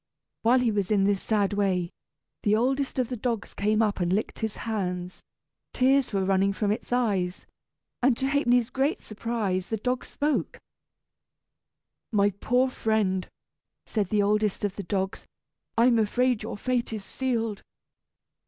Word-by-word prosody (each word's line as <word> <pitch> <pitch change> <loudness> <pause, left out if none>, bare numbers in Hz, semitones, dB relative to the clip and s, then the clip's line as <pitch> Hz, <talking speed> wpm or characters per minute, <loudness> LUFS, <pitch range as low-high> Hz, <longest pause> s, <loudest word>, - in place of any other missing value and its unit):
While 235 +3 +4
he 240 -2 +2
was 200 -3 -1
in 205 -2 +3
this 200 -1 +2
sad 205 -2 +1
way, 185 -4 0 0.5
the 210 0 +3
oldest 265 +5 0
of 255 -3 0
the 250 - -2
dogs 230 -1 -3
came 215 +2 +2
up 210 -2 0
and 175 -1 0
licked 205 +4 -1
his 220 -2 -2
hands. 180 -5 -3 0.5
Tears 265 +1 +3
were 195 -2 0
running 195 +1 +2
from 205 +1 0
its 215 - -4
eyes, 200 -8 0 0.6
and 250 -1 +3
to 265 - 0
Ha'penny's 245 -4 +2
great 280 +7 0
surprise 215 -4 -2
the 220 - -2
dog 250 +4 -1
spoke. 295 +1 -1 1.5
"My 205 -2 +3
poor 245 +6 +1
friend!" 205 -6 0 0.6
said 205 -5 -1
the 210 0 +2
oldest 210 0 +1
of 200 -1 -3
the - - -4
dogs, 190 +1 -3 0.5
"I 230 - +5
am 240 -2 +4
afraid 245 +2 +2
your - - -5
fate 250 +2 -1
is 215 -3 -5
sealed. 230 -5 -2
215 Hz, 155 wpm, -27 LUFS, 200-245 Hz, 1.5 s, I